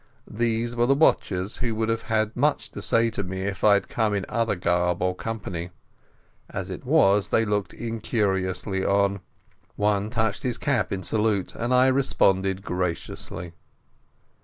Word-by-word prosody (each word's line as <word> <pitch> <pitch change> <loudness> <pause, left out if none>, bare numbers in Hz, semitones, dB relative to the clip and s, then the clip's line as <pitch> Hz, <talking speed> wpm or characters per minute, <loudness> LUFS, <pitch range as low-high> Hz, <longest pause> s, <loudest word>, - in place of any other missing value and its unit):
These 115 +1 -1
were 120 0 +2
the 135 - +4
watchers 100 - +1
who 120 -2 -2
would 110 0 -1
have 115 0 0
had 110 0 +1
much 145 +4 0
to - - -7
say 115 0 +2
to 105 - -1
me 95 +1 -5
if 100 -1 -4
I 105 -1 +7
had 100 - -1
come 110 -3 0
in 100 -2 -2
other 115 -2 0
garb 90 0 +1
or 90 0 +1
company. 90 -5 -5 0.8
As - - -5
it - - -7
was, 100 +1 +4
they 115 - +2
looked 105 -2 -2
incuriously 100 -4 -1
on. 100 0 +2 0.6
One 105 0 +1
touched 110 -3 0
his 125 -2 -2
cap 120 -9 0
in 95 -1 -3
salute, 105 -2 0
and 120 +2 -3
I 125 0 +5
responded 95 -8 +2
graciously. 90 -1 -4
105 Hz, 160 wpm, -25 LUFS, 95-115 Hz, 0.8 s, I